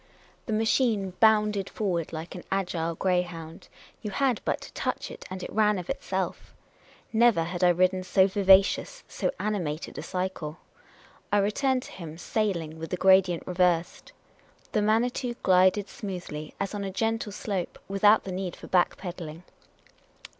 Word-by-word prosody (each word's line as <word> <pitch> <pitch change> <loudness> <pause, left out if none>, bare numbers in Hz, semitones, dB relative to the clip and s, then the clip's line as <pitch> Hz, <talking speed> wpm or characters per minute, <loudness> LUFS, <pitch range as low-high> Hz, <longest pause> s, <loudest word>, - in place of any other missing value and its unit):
The - - -3
machine 220 -3 +1
bounded 210 -3 +3
forward 175 -6 -2
like 160 +1 -6
an 180 - -8
agile 175 -4 -1
greyhound. 175 -3 -2 0.3
You 210 - -4
had 255 +2 +1
but - - -1
to - - -11
touch - - -3
it, - - -10
and 185 0 -6
it - - -7
ran 210 -1 +3
of 180 -2 -4
itself. 190 -1 -4 0.6
Never 225 -6 +4
had 175 +2 -3
I 180 - +7
ridden 185 +2 +2
so 185 +1 +4
vivacious, 195 - +3
so - - -2
ani 210 -1 0
mated 155 -2 -4
a - - -4
cycle. 180 -4 -4 0.7
I 205 - +4
returned 255 +6 +1
to - - -11
him, 165 -3 -8
sailing, 170 -5 -2
with 165 - -6
the 180 - -2
gradient 190 -2 +4
reversed. 180 - 0 0.6
The 215 - +1
Manitou 240 +3 +1
glided 185 +2 +4
smoothly, 180 -8 -7
as 195 0 -2
on 205 -1 -3
a 195 - -3
gentle 225 +2 -1
slope, 195 -3 -4
without 205 +2 +4
the 190 - -6
need 185 -1 -4
for - - -12
back 180 -2 +2
pedalling. 170 -3 -7
190 Hz, 160 wpm, -27 LUFS, 175-210 Hz, 0.7 s, I